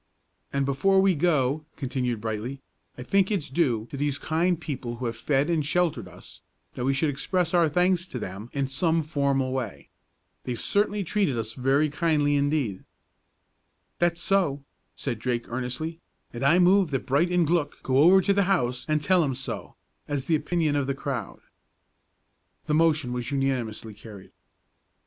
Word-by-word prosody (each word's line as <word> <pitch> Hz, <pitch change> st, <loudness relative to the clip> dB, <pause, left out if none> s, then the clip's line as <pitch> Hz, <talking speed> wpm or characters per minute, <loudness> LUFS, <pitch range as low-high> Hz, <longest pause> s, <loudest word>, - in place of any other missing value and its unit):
"And 140 Hz, 0 st, 0 dB
before 190 Hz, +9 st, +3 dB
we 190 Hz, 0 st, +4 dB
go," 150 Hz, -3 st, +1 dB
continued 125 Hz, -4 st, -2 dB
Brightly, 115 Hz, +5 st, -4 dB, 0.4 s
"I 125 Hz, -, -6 dB
think 195 Hz, +7 st, +2 dB
it's 170 Hz, -10 st, -2 dB
due 130 Hz, -8 st, +1 dB
to 140 Hz, -, -5 dB
these 145 Hz, 0 st, 0 dB
kind 165 Hz, +3 st, 0 dB
people 130 Hz, -7 st, -5 dB
who 125 Hz, +1 st, -5 dB
have 115 Hz, -1 st, -2 dB
fed 135 Hz, +5 st, +1 dB
and 165 Hz, -3 st, +1 dB
sheltered 175 Hz, +3 st, 0 dB
us, -, -, -14 dB, 0.3 s
that 125 Hz, -, -4 dB
we 135 Hz, -, +2 dB
should 145 Hz, +2 st, +1 dB
express 170 Hz, +5 st, -1 dB
our 170 Hz, -3 st, +4 dB
thanks 180 Hz, +2 st, +1 dB
to 130 Hz, -, -6 dB
them 100 Hz, +1 st, -6 dB
in 140 Hz, -1 st, -1 dB
some 160 Hz, +5 st, +1 dB
formal 140 Hz, -4 st, 0 dB
way. 125 Hz, -6 st, -5 dB, 0.5 s
They've 120 Hz, -2 st, -4 dB
certainly 205 Hz, 0 st, 0 dB
treated 185 Hz, -, 0 dB
us 110 Hz, 0 st, -4 dB
very 135 Hz, +4 st, +2 dB
kindly 150 Hz, -2 st, +1 dB
indeed." 140 Hz, -9 st, 0 dB, 1.2 s
"That's 175 Hz, 0 st, +1 dB
so," 165 Hz, -8 st, +1 dB, 0.3 s
said 120 Hz, -5 st, -4 dB
Drake, 120 Hz, 0 st, -2 dB
earnestly; 130 Hz, +7 st, -4 dB, 0.3 s
"and 120 Hz, +2 st, -5 dB
I 145 Hz, +6 st, +5 dB
move 185 Hz, 0 st, +4 dB
that 135 Hz, -3 st, -2 dB
Bright 140 Hz, +6 st, +2 dB
and 180 Hz, -1 st, +2 dB
Glück 165 Hz, -2 st, +1 dB
go 130 Hz, 0 st, +2 dB
over 180 Hz, +6 st, +7 dB
to 200 Hz, +2 st, +2 dB
the 200 Hz, -1 st, +2 dB
house 125 Hz, -9 st, 0 dB
an' 155 Hz, -, +3 dB
tell 175 Hz, +4 st, +3 dB
'em 135 Hz, -4 st, -1 dB
so, 130 Hz, -, -6 dB, 0.3 s
as 140 Hz, -2 st, -2 dB
the 165 Hz, -, +2 dB
opinion 155 Hz, -1 st, 0 dB
of 140 Hz, -2 st, 0 dB
the 135 Hz, -, -1 dB
crowd." 135 Hz, -6 st, -5 dB, 1.2 s
The 150 Hz, -, -1 dB
motion 155 Hz, -5 st, +2 dB
was 125 Hz, -1 st, -3 dB
unanimously 125 Hz, -6 st, -2 dB
carried. 105 Hz, -2 st, -12 dB
145 Hz, 170 wpm, -26 LUFS, 125-170 Hz, 1.2 s, over